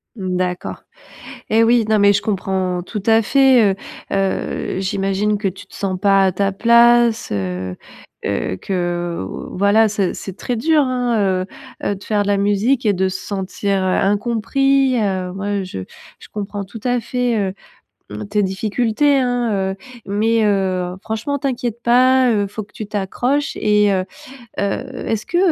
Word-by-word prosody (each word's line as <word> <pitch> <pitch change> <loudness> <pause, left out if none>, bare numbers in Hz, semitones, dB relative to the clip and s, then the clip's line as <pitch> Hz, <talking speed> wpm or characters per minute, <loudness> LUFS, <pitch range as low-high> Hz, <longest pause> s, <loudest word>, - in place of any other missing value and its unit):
D'accord. 185 -3 -3 0.7
Et 225 +1 +4
oui, 235 0 +4
non, 215 - +4
mais 200 0 +5
je 200 - +1
comprends 190 -3 -1
tout 210 +3 -5
à 225 0 +5
fait, 260 -4 +5
heu. - - -2 0.4
Heu, 195 -1 -1
j'imagine 195 +2 0
que 205 - 0
tu 190 +1 -6
te - - -22
sens 190 -2 -3
pas 195 -1 +4
à 190 - +2
ta 195 +2 0
place, 235 +2 +4
heu, 95 -2 -3 0.5
que 95 - -2
que 175 - -2 0.3
voilà, 205 +3 +3
ce 200 -3 -1
c'est 195 -1 -8
très 245 - -3
dur, 310 +6 +3
hein, 235 -8 0
heu - - -7 0.4
heu, 200 - 0
de 195 - -12
faire 210 -2 0
de 205 - -2
la 205 0 +2
musique 205 +6 +1
et 210 - +4
de 190 0 0
se 185 0 -5
sentir, 195 0 -2
heu, - - 0
incompris, 240 +7 +2
heu. 185 -3 -1
Moi, 200 +1 -2
je 185 - -6 0.4
je - - -13
comprends 205 -1 -4
tout 210 +3 -10
à 245 -1 +1
fait, 245 0 -1
heu, 190 -2 -1 0.8
tes 205 0 +1
difficultés, 225 +8 +1
hein, 245 -2 0
heu, 190 -1 -1 0.3
mais 220 +3 +1
heu, 185 -3 0
franchement 225 +7 -3
t'inquiète 245 -4 -3
pas, 255 +1 +4
heu, 205 -2 +1
faut 215 +2 -6
que 205 - -22
tu 215 - -6
t'accroches. 240 +8 -1
Et 210 -1 +3
heu, 185 -1 +1 0.6
heu, 200 -1 -1 0.2
est-ce 220 -1 -2
que, 345 - 0
205 Hz, 165 wpm, -19 LUFS, 190-235 Hz, 0.8 s, mais